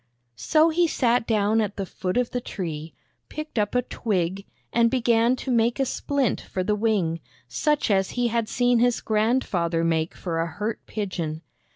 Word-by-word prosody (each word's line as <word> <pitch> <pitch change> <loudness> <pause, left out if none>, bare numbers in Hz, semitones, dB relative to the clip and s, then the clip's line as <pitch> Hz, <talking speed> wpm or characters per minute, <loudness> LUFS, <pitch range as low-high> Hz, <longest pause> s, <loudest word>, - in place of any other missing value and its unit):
So 315 +1 +4
he 340 +1 +2
sat 245 -6 +1
down 220 0 +2
at 205 -1 -2
the 195 - -3
foot 185 +3 -3
of 250 -1 +1
the 245 - -2
tree, 165 -8 -5 0.3
picked 305 -6 -4
up 205 +3 0
a 250 - +3
twig, 195 -4 -2 0.3
and 235 0 +4
began 235 -1 +3
to 260 +1 -4
make 235 +1 +2
a 270 - +3
splint 275 -2 -1
for 185 - -4
the 210 - +1
wing, 205 -7 0 0.3
such 300 -6 0
as 190 -1 +2
he 245 -1 +2
had 230 -1 -1
seen 245 -1 +2
his 245 0 +3
grandfather 210 -7 +1
make 165 0 0
for 165 -3 -3
a 165 - -1
hurt 210 +6 -4
pigeon. 175 -6 -4
220 Hz, 180 wpm, -25 LUFS, 185-245 Hz, 0.3 s, So